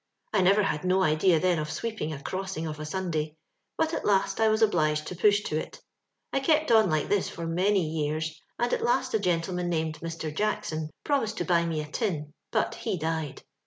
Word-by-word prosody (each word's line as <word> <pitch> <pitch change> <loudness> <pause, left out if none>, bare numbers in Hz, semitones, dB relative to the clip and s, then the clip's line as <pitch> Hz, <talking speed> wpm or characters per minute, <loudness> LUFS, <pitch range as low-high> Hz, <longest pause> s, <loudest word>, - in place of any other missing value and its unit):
"I 210 - +4
never 200 +3 +5
had 150 -4 -1
no 185 +1 +3
idea 155 +1 +4
then 180 -1 +2
of 150 0 -3
sweeping 220 -4 -3
a 145 - -5
crossing 185 +2 -4
of 155 -1 -5
a 155 - -4
Sunday; 160 -3 -2 0.4
but 320 0 +1
at - - -2
last 195 +1 +2
I 220 - +4
was 215 +1 +3
obliged 155 -7 +2
to 180 - -6
push 205 +3 +4
to 155 - -1
it. - - -8 0.5
I - - +3
kept 310 0 +2
on 220 -4 +6
like 155 -2 +1
this 205 -2 +1
for 170 - -6
many 185 +3 +2
years, 155 0 -2 0.2
and 240 +1 0
at - - +1
last 255 +1 +1
a 220 - +3
gentleman 180 -1 0
named 160 -2 -1
Mr. 160 -2 -5
Jackson 160 -6 -1
promised 225 -7 0
to - - -1
buy 170 -2 +2
me 160 -2 -1
a 150 - -6
tin, 150 -5 -2 0.2
but - - +1
he 215 -6 -3
died. 160 -3 -3
175 Hz, 210 wpm, -28 LUFS, 155-205 Hz, 0.5 s, on